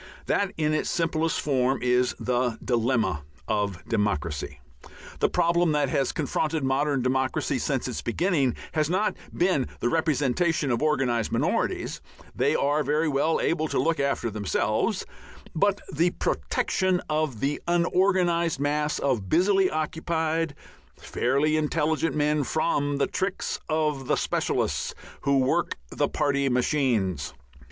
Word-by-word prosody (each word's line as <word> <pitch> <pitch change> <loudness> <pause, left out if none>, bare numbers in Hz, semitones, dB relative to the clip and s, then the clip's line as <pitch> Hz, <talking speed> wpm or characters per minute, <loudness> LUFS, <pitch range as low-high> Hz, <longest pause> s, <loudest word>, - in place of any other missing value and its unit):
That 200 -2 +1
in 155 -1 +1
its 155 - 0
simplest 165 -1 0
form 130 -2 +1
is 125 0 +2
the 125 -2 0
dilemma 115 - +1 0.3
of 100 -4 -1
democracy. 100 -9 -2 0.6
The - - +3
problem 170 -1 +2
that 145 -2 +1
has 135 -1 +1
confronted 155 0 -1
modern 135 0 +1
democracy 130 +1 0
since 130 +1 -1
its 125 - -4
beginning 140 -2 +1 0.2
has 155 -1 0
not 205 +4 +1 0.2
really - - -12
been 165 -9 +1
the 120 - 0
representation 155 0 +1
of 120 - 0
organized 130 -7 +1
minorities - - -1 0.3
they - - +2
are 145 +2 +2
very 150 +3 +1
well 150 +3 +1
able 160 -1 0
to - - -2
look 165 0 +1
after 140 -4 0
themselves 105 -2 0 0.5
but 200 +4 +1
_the 170 +4 +1
protection 185 -1 0
of 150 -6 -1
the 140 +4 -1
unorganized 175 -2 +2
mass 150 +1 0
of 120 -9 -1
busily 190 +2 +3
occupied, 160 0 -1 0.4
fairly 140 +5 0
intelligent 155 +1 0
men 150 0 +2
from 145 0 0
the 140 - +2
tricks 190 0 -2
of 150 -4 0
the - - +2
specialists - - -1 0.3
who 140 0 +2
work 135 +6 +1
the - - 0
party 140 -1 +1
machines_. 120 - 0
150 Hz, 135 wpm, -26 LUFS, 130-165 Hz, 0.6 s, The